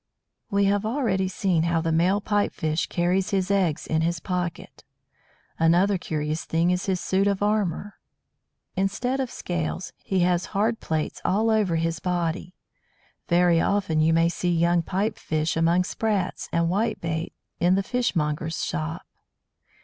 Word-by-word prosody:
We 200 0 +2
have 200 +1 +2
already 215 -5 0
seen 185 -2 0
how 170 0 +1
the 165 0 -1
male 180 +5 +2
Pipe 205 0 +1
fish 155 +1 -1
carries 180 +2 0
his 195 -2 0
eggs 180 -5 +1
in 160 0 0
his 170 +1 0
"pocket." 175 -1 -4 0.8
Another 175 +4 +3
curious 155 -1 -2
thing 165 +2 +1
is 180 +2 -1
his 185 -2 +1
suit 195 +3 +1
of 200 0 0
armour. 205 -2 -1 0.8
Instead 245 +8 -1
of 260 -2 -1
scales, 175 -1 -4
he 190 -2 0
has 175 0 +2
hard 225 +3 +1
plates 155 -1 -3
all 215 +4 +2
over 210 -6 +2
his 165 0 -1
body. 175 0 -2 0.7
Very 170 -1 +4
often 185 -6 +1
you 160 +1 +4
may 165 +1 +4
see 175 +1 -1
young 170 0 +3
Pipe 195 +6 -2
fish 155 0 -1
among 165 +2 +3
Sprats 200 -1 -2
and 170 0 +2
"Whitebait" 175 -4 -1 0.3
in 175 +2 +4
the 195 - +1
fishmonger's 165 -10 -1
shop. 80 0 -4
180 Hz, 150 wpm, -25 LUFS, 165-200 Hz, 0.8 s, Very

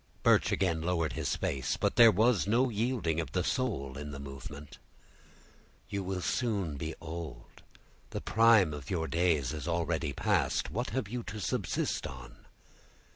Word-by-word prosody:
Birch - - +4
again 85 -4 +1
lowered 85 -1 0
his - - -1
face, 65 -2 -1
but - - 0
there 115 -1 +9
was 110 0 +3
no 125 +5 +3
yielding 110 -7 0
of 80 - -4
the 90 - +1
soul 70 - -2
in 75 0 -6
the 70 -1 -7
movement. 70 +1 -9 1.1
"You 100 - -2
will 95 0 -3
soon 100 - -1
be 80 +2 -4
old; 80 -6 -8 0.5
the - - -4
prime 110 -7 +4
of 70 -3 -7
your 80 -3 -1
days 80 -6 +1
is 80 +1 -5
already 85 -3 0
past; 70 - 0
what 120 +8 -2
have 130 -6 -2
you 120 +3 -4
to 110 - -6
subsist 95 - -1
on?" 65 -2 -11
85 Hz, 160 wpm, -31 LUFS, 75-105 Hz, 1.1 s, there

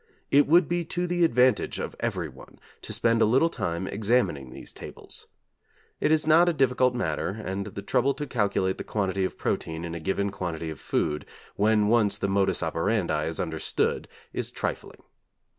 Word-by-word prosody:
It 145 +1 +5
would 170 +4 +5
be 175 0 0
to 175 +2 -2
the 175 0 +1
advantage 125 -4 +3
of - - -4
everyone - - -4 0.2
to - - -8
spend 115 0 +2
a - - +6
little 130 +9 +4
time 85 +2 -2
examining 100 - 0
these 65 - -10
tables. - - -8 0.7
It - - +2
is 155 0 +3
not 165 +3 +6
a - - +1
difficult 125 -3 +2
matter, 85 -9 -1 0.2
and 95 +2 -3
the 100 0 -7
trouble 135 +6 +1
to 150 - -4
calculate 100 -6 0
the - - -3
quantity 95 -2 -1
of - - -5
protein 80 +1 -2
in 85 - -5
a 85 - -4
given 95 +4 -1
quantity 85 -4 -4
of 75 - -9
food, 75 0 -1 0.3
when 105 0 +3
once 105 -3 +3
the 100 - -1
modus 95 -2 +1
operandi 80 -2 0
is 80 0 -4
understood, 80 -2 -1 0.3
is - - -3
trifling. - - -5
105 Hz, 175 wpm, -27 LUFS, 85-130 Hz, 0.7 s, a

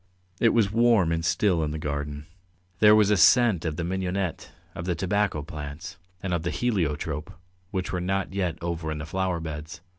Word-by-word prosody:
It 115 - +5
was 110 -4 +2
warm 115 -6 +4
and 80 0 -1
still 90 0 +2
in 75 - -1
the 75 - -4
garden. 75 -1 -4 0.5
There 105 0 +7
was 105 -1 +4
a 105 - +4
scent 105 -1 +5
of 80 -2 -1
the 85 - -3
mignonette, 95 0 -3 0.2
of 85 - -6
the 90 -1 0
tobacco 95 -2 0
plants, 75 +1 -7 0.3
and 95 -2 -1
of 85 - 0
the 85 - -2
heliotrope, 80 -10 -1 0.4
which 95 -2 -3
were 90 - -2
not 95 +1 -1
yet 90 -4 -1
over 85 -2 -3
in 75 - -3
the 75 - -5
flower 90 +1 -1
beds. 80 +1 -7
85 Hz, 190 wpm, -26 LUFS, 80-95 Hz, 0.5 s, There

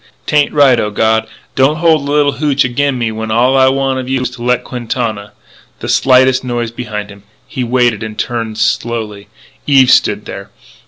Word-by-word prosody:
'Tain't 145 -1 +1
right.... 140 -5 +4
O 105 - -1
God, 110 +1 0 0.3
don't 135 +3 +2
hold 155 -3 +1
a - - -1
little 145 -1 +2
hootch 145 -2 +1
agin 135 +2 -1
me 115 -2 -2
when 110 0 -5
all 120 +4 +2
I 130 0 +4
want 135 0 0
of 130 0 -6
you 135 -1 0
is 125 -1 -3
to 125 -1 -12
let 125 0 0
Quintana 115 -4 -4 0.2
" - - -29
The - - -6
slightest 130 0 +3
noise 120 -2 -3
behind 105 -4 -6
him. 100 0 -14 0.3
He 130 - -4
waited, 120 -3 0
turned 115 -2 -3
slowly. 110 -2 -2 0.4
Eve 135 -3 +5
stood - - +2
there. - - -8
125 Hz, 190 wpm, -14 LUFS, 110-135 Hz, 0.4 s, Eve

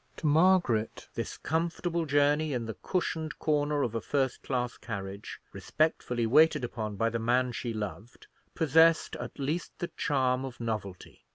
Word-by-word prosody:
To - - -6
Margaret, 155 -8 +3
this - - -4
comfortable 170 +1 -1
journey 145 +1 +2
in 120 -2 -2
the 110 - -4
cushioned 160 - -2
corner 145 -1 +1
of 115 - -2
a 115 - -2
first 135 +1 -1
class 125 -2 -2
carriage, 100 -2 -6
respectfully 125 -6 0
waited 150 +4 +5
upon 110 -3 -4
by 115 +3 +1
the 115 - -2
man 125 +2 +2
she 120 0 -4
loved, 110 +1 -6 0.3
possessed 160 +1 +4
at 120 0 -7
least 150 +5 -3
the 175 - -4
charm 130 -4 +1
of 130 -3 -7
novelty. 105 -5 -5
130 Hz, 155 wpm, -29 LUFS, 115-155 Hz, 0.3 s, waited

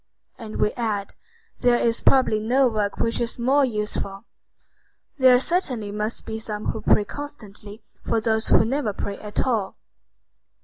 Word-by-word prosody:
And 220 -2 -8
we 210 - +2
add: 215 -4 -3 0.5
"There 245 -1 +4
is 230 -1 0
probably 255 -5 +3
no 250 +5 +3
work 210 -3 -1
which 230 +1 -1
is 235 -1 -2
more 265 +4 +3
useful." 210 -3 -3 0.9
There 255 -1 +7
certainly 255 - -1
must 210 +2 -4
be 220 0 -5
some 215 -1 -6
who 220 - -6
pray 210 - +3
constantly 215 -7 -9 0.2
for 230 - 0
those 220 0 0
who - - +5
never 250 -3 -1
pray 200 +1 -5
at 210 -1 -3
all. 225 -7 -1
225 Hz, 150 wpm, -23 LUFS, 210-250 Hz, 0.9 s, There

